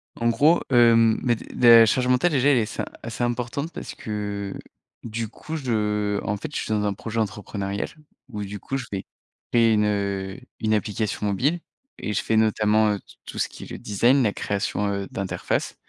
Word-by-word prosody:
En 115 0 +1
gros, 155 +8 +4
hem, 115 -2 +5
mais 120 -2 +3
des 120 +2 +2
la 115 - +8
charge 125 +3 +1
mentale, 125 +8 +3
déjà, 140 -1 +3
elle 140 - +5
est - - +3
assez 105 - -4 0.2
assez 115 +1 -4
importante 125 +6 -2
parce - - -7
que, 100 -2 -4
heu, - - -8 0.4
du 115 0 -3
coup, 155 +8 -7
je, 130 -5 -3
heu, 105 -2 0
en 105 - -1
fait, 145 +8 -7
je - - -1
suis - - -6
dans 105 -1 +1
un 100 - 0
projet 115 +3 -4
entrepreneurial 100 -1 -3 0.4
où 105 -4 -5
du 100 +1 -6
coup 135 - -3
je 130 - -5
vais 95 -1 -4 0.5
créer 115 -2 +4
une, 105 -1 +3
heu, 100 -2 -1 0.2
une 110 0 +1
application 105 0 -1
mobile 135 - +1 0.4
et 105 - -3
je 95 - 0
fais 110 - 0
notamment, 110 -1 +3
heu, 100 - -3
t - - -26 0.2
tout - - -9
ce - - +1
qui - - -11
est - - -10
le - - -5
design, 120 +7 +3
la 105 -3 +1
création, 100 0 -1
heu, 100 -1 -3
d'interface 95 -1 -2
110 Hz, 210 wpm, -24 LUFS, 105-120 Hz, 0.5 s, la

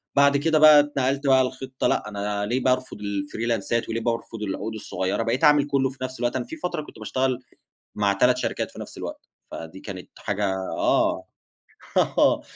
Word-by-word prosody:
بعد 140 0 +5
كده 155 +2 +2
بقى 155 -1 +9
اتنقلت 140 -1 0
بقى 130 -1 +6
لخطة، 130 0 -3
لأ، 105 - 0
أنا 100 0 -2
ليه 125 +4 -1
بارفُض 130 -2 0
الفريلانسات 105 +3 -2
وليه 115 0 -2
بارفض 115 -1 -3
العقود 105 +2 -3
الصغيرة؟ 100 -1 -2
بقيت 120 +6 -1
أعمل 150 -1 +5
كُلّه 135 -2 +1
في 130 - -13
نفس 130 -2 -5
الوقت، 120 +1 0
أنا 125 -2 -1
في 160 - -8
فترة 175 0 -3
كنت 150 - -13
باشتغل 130 +3 -1 0.6
مع 100 -1 +2
3 125 +6 +3
شركات 125 - -2
في - - -11
نفس - - -9
الوقت، - - -7 0.2
فدي 80 +4 -8
كانت 95 -3 -8
حاجة 105 0 -1 0.3
آه، - - +2 0.7
آه. - - +3
125 Hz, 175 wpm, -24 LUFS, 105-135 Hz, 0.7 s, بقى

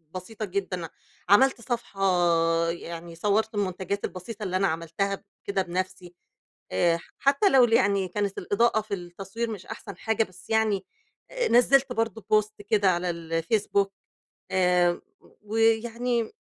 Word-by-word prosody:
بسيطة 215 +4 -5
جدًا، 185 -3 -3 0.4
عملت 255 +4 +5
صفحة 230 -4 -4 0.7
يعني 170 0 -6
صوّرت 210 +5 0
المنتَجات 200 0 -2
البسيطة 205 +4 -7
اللي 185 -2 -2
أنا 195 +1 +3
عملتها 170 +5 -2 0.2
كده 200 -1 0
بنفسي 185 0 -4 0.6
آآ، 165 - +2 0.2
حتى 280 +8 +3
لو 265 -2 +6
يعني 200 -4 +2
كانت 200 +2 -2
الإضاءة 225 +1 +2
في 215 -1 -7
التصوير 195 +5 -5
مش 200 -4 -7
أحسن 200 -5 -8
حاجة 220 +3 +1
بس 185 +1 -15
يعني 215 -3 +1 0.5
آآ - - 0
نزّلت 255 +2 +4
برضه 225 -1 -2
post 215 0 +3 0.2
كده 200 -3 +4
على 175 0 -1 0.3
الFacebook 200 +2 +1 0.6
آآ 180 -1 +3 0.4
ويعني 225 +2 +1
200 Hz, 130 wpm, -26 LUFS, 185-225 Hz, 0.7 s, لو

